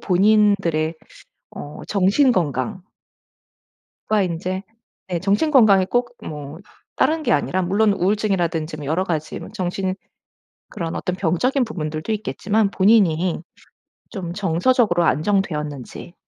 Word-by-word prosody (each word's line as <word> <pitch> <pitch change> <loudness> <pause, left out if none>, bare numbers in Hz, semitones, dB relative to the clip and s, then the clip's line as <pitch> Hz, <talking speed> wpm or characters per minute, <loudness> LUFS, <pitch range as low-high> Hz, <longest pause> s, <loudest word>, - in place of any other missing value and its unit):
본인들의 195 -5 +2 0.6
어 145 - -9
정신 210 +7 +3
건강 150 - -1 1.3
그러니까 195 -5 +1
인제 185 +3 -4 0.4
네. 175 -2 -2
정신 205 - +1
건강이 210 -9 +6
꼭 245 0 -1
뭐 150 +1 -7 0.4
다른 315 0 +1
게 - - 0
아니라 180 +5 0
물론 200 +3 +2
우울증이라든지 180 -6 0
뭐 150 - -7
여러 165 +6 0
가지 155 -4 -3
뭐 - - -9
정신 185 -1 -2 0.7
그런 165 -2 -5
어떤 180 0 -3
병적인 205 - +1
부분들도 155 -2 -4
있겠지만 210 0 0
본인이 185 -5 +3 0.7
좀 180 -6 -5
정서적으로 190 +1 +2
안정되었는지 150 - -2
185 Hz, 280 characters per minute, -21 LUFS, 165-210 Hz, 1.3 s, 건강이